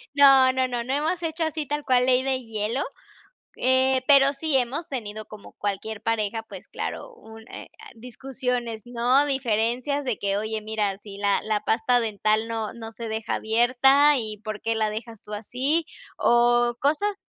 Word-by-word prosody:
No, 270 -2 +7
no, 260 0 +1
no, 245 -2 -3
no 255 +3 -3
hemos 310 +5 -1
hecho 325 0 -2
así 315 -1 -2
tal 295 +1 -3
cual 250 -2 +3
ley 255 0 +3
de 265 -1 0
hielo, 225 +3 -2 0.7
eh, 260 0 +2
pero 275 -1 +6
sí 290 0 0
hemos 265 +7 -1
tenido 215 -6 -5
como 215 -1 -13
cualquier 205 +1 -4
pareja, 225 -1 -1
pues 195 -3 -10
claro, - - -6
un 225 - -14
eh, - - -10 0.2
discusiones, 245 -1 -4
¿no? 245 +3 +2
Diferencias 255 +2 0
de 250 -5 -2
que: 200 0 -1
"Oye, 220 +1 -3
mira, 210 -2 -2
si 200 -1 -11
la 200 0 +1
la 215 -1 -1
pasta 245 +3 +2
dental 215 0 0
no 225 -2 -3
no 225 -1 -8
se 230 0 -7
deja 220 0 -3
abierta 255 +6 +4
y 215 -4 -4
¿por 215 -1 -5
qué 225 - 0
la 220 -1 0
dejas 225 0 -8
tú 210 - -12
así?". 260 +10 -1 0.3
O 240 0 +3
cosas 355 +9 +1
240 Hz, 175 wpm, -24 LUFS, 220-270 Hz, 0.7 s, No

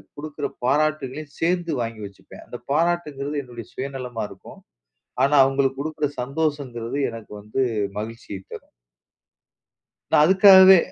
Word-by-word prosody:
குடுக்கிற 150 0 -6 0.2
பாராட்டுகளையும் 150 0 -1
சேர்ந்து 175 0 0
வாங்கி 115 -2 -5
வச்சுப்பேன். 100 -1 -13
அந்த 120 - -8
பாராட்டுங்கிறது 150 -3 -1
என்னுடைய 120 -3 -10
சுயநலமா 130 -4 -5
இருக்கும். - - -14 0.6
ஆனா, 145 +2 +3
அவுங்களுக்கு 135 0 0
குடுக்கிற 150 -1 -2
சந்தோஷம்ங்கறது 140 -3 -3
எனக்கு 115 -2 -10
வந்து 110 +6 -1 0.4
மகிழ்ச்சியைத் 110 -3 -8
தரும். - - -11 1.4
நான் 150 - +6
அதுக்காகவே, 190 +1 +8
140 Hz, 110 wpm, -23 LUFS, 120-155 Hz, 1.4 s, அதுக்காகவே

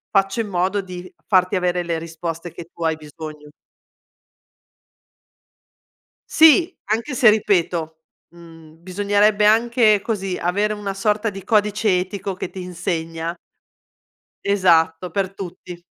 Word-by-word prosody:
faccio 195 +3 +2
in 215 - -5
modo 190 +2 0
di 180 -1 -9
farti 185 -1 +2
avere 180 -1 0
le 170 -1 -2
risposte 165 +1 -6
che 170 0 -11
tu 170 - -8
hai 160 -1 +1
bisogno. 150 -1 -10 2.8
Sì, 325 +3 +5
anche 230 +6 -2
se 235 -2 +6
ripeto, 170 -6 0 0.3
mhmm, 165 -1 -16
bisognerebbe 205 +3 +2
anche 225 -1 +4
così 195 -5 -3
avere 205 +5 0
una 205 -2 -4
sorta 210 +2 0
di 195 -2 -9
codice 210 -2 +2
etico 195 +1 -4
che 180 - -6
ti 190 - -8
insegna 170 -2 -4 1.1
Esatto 175 -3 +2
per 195 -1 -2
tutti. 180 -2 -9
185 Hz, 120 wpm, -21 LUFS, 170-210 Hz, 2.8 s, se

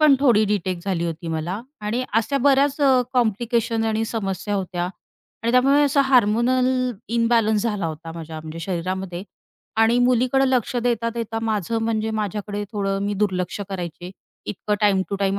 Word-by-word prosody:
पण 305 -2 +7
थोडी 235 -6 +5
डिटेक्ट 190 -4 -2
झाली 180 -4 -1
होती 165 0 -5
मला. 165 +5 -3 0.2
आणि 220 +5 -2
अशा 230 +5 +1
बऱ्याच 280 +2 +3
अ, 265 -3 +5
कॉम्प्लिकेशन्स 230 -1 +1
आणि 220 0 0
समस्या 205 -3 -3
होत्या 180 -3 -2 0.6
आणि 230 - +1
त्यामुळे 275 +3 +5
असा 285 0 +3
हार्मोनल 250 +1 +3 0.5
इम्बॅलन्स 230 -2 +2
झाला 210 -6 -1
होता 160 +1 -6
माझ्या 160 -1 -7
म्हणजे 155 +1 -8
शरीरामध्ये. 185 +1 -3 0.5
आणि 225 +2 +4
मुलीकडं 250 +2 +3
लक्ष 255 -2 0
देता-देता 230 -1 -1
माझं 220 0 -1
म्हणजे 220 -1 0
माझ्याकडे 205 0 -3
थोडं 195 -2 -1
मी 205 0 -1
दुर्लक्ष 185 -1 -1
करायचे. 175 -2 -6 0.4
इतकं 210 +1 -2
टाईम 200 -3 +3
टू 200 - -2
टाईम 195 0 +1
215 Hz, 150 wpm, -22 LUFS, 190-240 Hz, 0.6 s, पण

